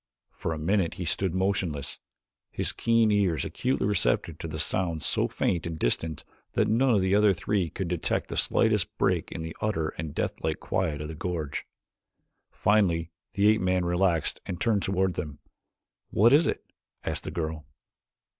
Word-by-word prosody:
For 80 Hz, -, -4 dB
a 80 Hz, -, -2 dB
minute 85 Hz, +2 st, +1 dB
he 90 Hz, -, -4 dB
stood 95 Hz, +2 st, +1 dB
motionless, 95 Hz, -7 st, -1 dB, 0.5 s
his -, -, -1 dB
keen 115 Hz, -2 st, +2 dB
ears 95 Hz, -8 st, +2 dB
acutely 130 Hz, -5 st, -1 dB
receptive 85 Hz, -5 st, 0 dB
to 80 Hz, -1 st, -5 dB
sounds 80 Hz, 0 st, 0 dB
so -, -, +2 dB
faint 85 Hz, -2 st, -1 dB
and 80 Hz, -1 st, -4 dB
distant 80 Hz, +3 st, -1 dB, 0.3 s
that -, -, +2 dB
none 120 Hz, +2 st, +3 dB
of 100 Hz, -, +3 dB
the 95 Hz, +1 st, +1 dB
other 105 Hz, -1 st, +5 dB
three 95 Hz, -1 st, -1 dB
could 95 Hz, +1 st, -4 dB
detect 85 Hz, -1 st, -1 dB
the -, -, -4 dB
slightest -, -, +2 dB
break -, -, +1 dB
in 80 Hz, -, -5 dB
the 80 Hz, 0 st, -6 dB
utter 80 Hz, -8 st, 0 dB
and 75 Hz, -2 st, -5 dB
deathlike -, -, -2 dB
quiet 80 Hz, -6 st, -1 dB
of 75 Hz, -, -4 dB
the 80 Hz, -, -6 dB
gorge. 80 Hz, -3 st, -4 dB, 0.8 s
Finally 85 Hz, -6 st, +2 dB, 0.2 s
the 100 Hz, +1 st, +2 dB
ape 110 Hz, +1 st, +4 dB
man 90 Hz, -1 st, +1 dB
relaxed 85 Hz, -2 st, +1 dB
and 90 Hz, -, -4 dB
turned 105 Hz, -2 st, +2 dB
toward 95 Hz, -1 st, +1 dB
them. 75 Hz, -3 st, -5 dB, 0.7 s
"What 115 Hz, +5 st, +5 dB
is 150 Hz, +3 st, +5 dB
it?" -, -, -2 dB, 0.4 s
asked -, -, -3 dB
the -, -, -3 dB
girl. 80 Hz, -2 st, -4 dB
90 Hz, 170 wpm, -27 LUFS, 80-100 Hz, 0.8 s, other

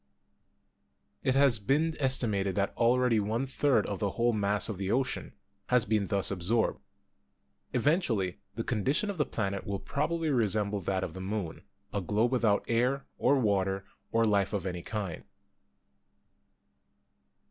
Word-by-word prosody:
It 130 Hz, -, +1 dB
has 135 Hz, -5 st, +4 dB
been 150 Hz, +10 st, +1 dB
estimated 110 Hz, -8 st, +1 dB
that 100 Hz, -1 st, 0 dB
already 120 Hz, -1 st, +3 dB
one 110 Hz, +5 st, -1 dB
third 135 Hz, -3 st, +2 dB
of 100 Hz, -, -4 dB
the 100 Hz, -, 0 dB
whole 120 Hz, 0 st, +3 dB
mass 105 Hz, -1 st, +1 dB
of 105 Hz, -4 st, -5 dB
the 95 Hz, -1 st, -2 dB
ocean 130 Hz, +3 st, -1 dB, 0.3 s
has 125 Hz, -3 st, +4 dB
been 105 Hz, -2 st, +1 dB
thus 100 Hz, -2 st, +1 dB
absorbed. 100 Hz, +5 st, +1 dB, 0.9 s
Eventually 120 Hz, -, +1 dB, 0.2 s
the 115 Hz, -, -2 dB
condition 130 Hz, -, 0 dB
of 190 Hz, -, -9 dB
the 150 Hz, -, +2 dB
planet 100 Hz, -2 st, -2 dB
will 100 Hz, -1 st, -3 dB
probably 160 Hz, +8 st, -1 dB
resemble 105 Hz, -4 st, +1 dB
that 95 Hz, +1 st, -1 dB
of 85 Hz, -, -4 dB
the 95 Hz, -, -7 dB
moon 95 Hz, -5 st, -4 dB, 0.2 s
— 100 Hz, 0 st, -36 dB
a 100 Hz, -, -1 dB
globe 110 Hz, +6 st, +1 dB
without 115 Hz, -5 st, +2 dB
air, 125 Hz, +4 st, +1 dB
or 140 Hz, -, +4 dB
water, 95 Hz, -4 st, 0 dB, 0.3 s
or 115 Hz, 0 st, +3 dB
life 100 Hz, -2 st, +2 dB
of 100 Hz, -2 st, -2 dB
any 90 Hz, -2 st, -3 dB
kind. 100 Hz, -4 st, -4 dB
110 Hz, 150 wpm, -30 LUFS, 100-125 Hz, 0.9 s, has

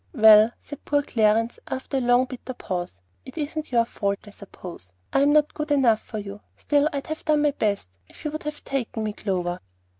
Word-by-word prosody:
"Well," 220 Hz, -2 st, +8 dB
said 290 Hz, 0 st, -10 dB
poor 290 Hz, 0 st, +1 dB
Clarence, 225 Hz, -1 st, +2 dB
after 265 Hz, +1 st, -3 dB
a -, -, +1 dB
long 245 Hz, +1 st, +4 dB
bitter 255 Hz, 0 st, -8 dB
pause; 175 Hz, -, -5 dB, 0.2 s
"it -, -, -12 dB
isn't 305 Hz, 0 st, -4 dB
your 235 Hz, -2 st, +3 dB
fault, 200 Hz, -3 st, -2 dB
I 205 Hz, -, -12 dB
suppose. 180 Hz, -, -11 dB, 0.2 s
I'm 280 Hz, +1 st, +4 dB
not 300 Hz, 0 st, +3 dB
good 300 Hz, -1 st, -4 dB
enough 255 Hz, -7 st, +4 dB
for 220 Hz, -, -7 dB
you. 200 Hz, 0 st, -7 dB, 0.2 s
Still, 290 Hz, +1 st, +2 dB
I'd 280 Hz, -1 st, -4 dB
have 315 Hz, +1 st, -5 dB
done 300 Hz, -1 st, +2 dB
my 295 Hz, -, +4 dB
best, 205 Hz, -, -1 dB, 0.2 s
if -, -, -15 dB
you 300 Hz, -, -1 dB
would 310 Hz, -, -5 dB
have 300 Hz, 0 st, -6 dB
taken 240 Hz, -4 st, -3 dB
me, 215 Hz, -1 st, -2 dB
Clover." 180 Hz, -4 st, -2 dB
240 Hz, 205 wpm, -24 LUFS, 210-290 Hz, 0.2 s, Well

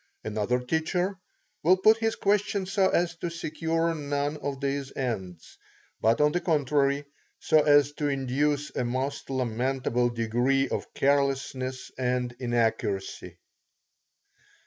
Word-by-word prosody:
Another 110 Hz, +3 st, 0 dB
teacher 175 Hz, +8 st, -1 dB, 0.4 s
will 180 Hz, +4 st, +5 dB
put 215 Hz, +4 st, +5 dB
his 225 Hz, 0 st, 0 dB
questions 200 Hz, -1 st, 0 dB
so 195 Hz, -2 st, +4 dB
as 170 Hz, -1 st, +1 dB
to 170 Hz, -, -3 dB
secure 165 Hz, 0 st, -1 dB
none 145 Hz, -1 st, -2 dB
of 140 Hz, -2 st, -4 dB
these 140 Hz, -1 st, -2 dB
ends, 95 Hz, -10 st, -5 dB, 0.4 s
but 115 Hz, +1 st, +3 dB
on 150 Hz, 0 st, +4 dB
the 175 Hz, -, -1 dB
contrary 145 Hz, -3 st, +1 dB, 0.3 s
so 155 Hz, -1 st, +4 dB
as 145 Hz, -1 st, +5 dB
to 145 Hz, 0 st, -2 dB
induce 140 Hz, +2 st, -1 dB
a -, -, 0 dB
most 130 Hz, +4 st, -3 dB
lamentable 125 Hz, -1 st, 0 dB
degree 120 Hz, +4 st, +1 dB
of -, -, -4 dB
carelessness 135 Hz, -2 st, 0 dB
and 125 Hz, -1 st, -1 dB
inaccuracy. 115 Hz, -5 st, -1 dB
140 Hz, 125 wpm, -27 LUFS, 125-155 Hz, 0.4 s, will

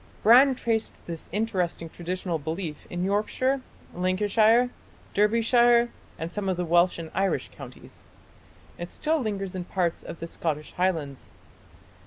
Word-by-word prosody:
Brand 255 Hz, +4 st, +7 dB
traced 225 Hz, -3 st, -1 dB
this 165 Hz, -2 st, -7 dB
interesting 185 Hz, -5 st, -1 dB
traditional 175 Hz, 0 st, -3 dB
belief 160 Hz, +1 st, -5 dB
in 175 Hz, 0 st, -3 dB
Yorkshire, 215 Hz, +7 st, 0 dB, 0.3 s
Lancashire, 210 Hz, +6 st, +3 dB, 0.4 s
Derbyshire, 235 Hz, +3 st, +4 dB, 0.3 s
and 165 Hz, +2 st, -5 dB
some 205 Hz, -2 st, -2 dB
of 185 Hz, -, 0 dB
the 180 Hz, -, -1 dB
Welsh 175 Hz, +2 st, +3 dB
and 165 Hz, -1 st, -7 dB
Irish 190 Hz, -2 st, 0 dB
counties. -, -, -12 dB, 0.7 s
It 175 Hz, 0 st, -5 dB
still 315 Hz, +1 st, 0 dB
lingers 195 Hz, -4 st, -3 dB
in 180 Hz, -1 st, -4 dB
parts 175 Hz, -3 st, -1 dB
of -, -, -8 dB
the 165 Hz, -, -4 dB
Scottish 155 Hz, -2 st, -3 dB
Highlands. 160 Hz, -7 st, -2 dB
185 Hz, 135 wpm, -26 LUFS, 170-225 Hz, 0.7 s, Brand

